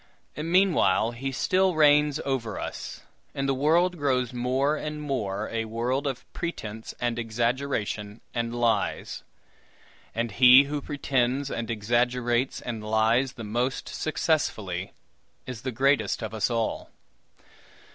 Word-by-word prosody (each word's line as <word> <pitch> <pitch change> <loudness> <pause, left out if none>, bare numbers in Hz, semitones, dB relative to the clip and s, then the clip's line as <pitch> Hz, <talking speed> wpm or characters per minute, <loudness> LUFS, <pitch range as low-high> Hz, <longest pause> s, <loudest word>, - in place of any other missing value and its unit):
Meanwhile, 160 - +3
he 135 +3 -4
still 185 +6 +2
reigns 150 -1 +4
over 130 -5 -2
us, - - -6 0.3
and 135 0 -1
the 135 - +2
world 165 +6 +2
grows 130 -4 0
more 130 +4 +1
and 150 0 -5
more 110 -9 -2
a 115 -1 -1
world 120 +5 -1
of 135 -3 -4
pretense 110 -10 -5
and 120 -1 -1
exaggeration 115 -2 -2
and 120 0 -2
lies; 120 -1 0 0.9
and 115 0 -1
he 125 +5 +8
who 145 +1 -3
pretends 135 -1 -1
and 115 -1 -3
exaggerates 120 +3 0
and 115 -3 -5
lies 110 +4 +2
the 115 - -8
most 120 +5 -2
successfully, 110 - -1 0.5
is 125 -3 -7
the 130 - -3
greatest 135 0 +1
of 110 - -5
us 110 +1 0
all. 115 -2 -2
125 Hz, 125 wpm, -26 LUFS, 115-140 Hz, 0.9 s, he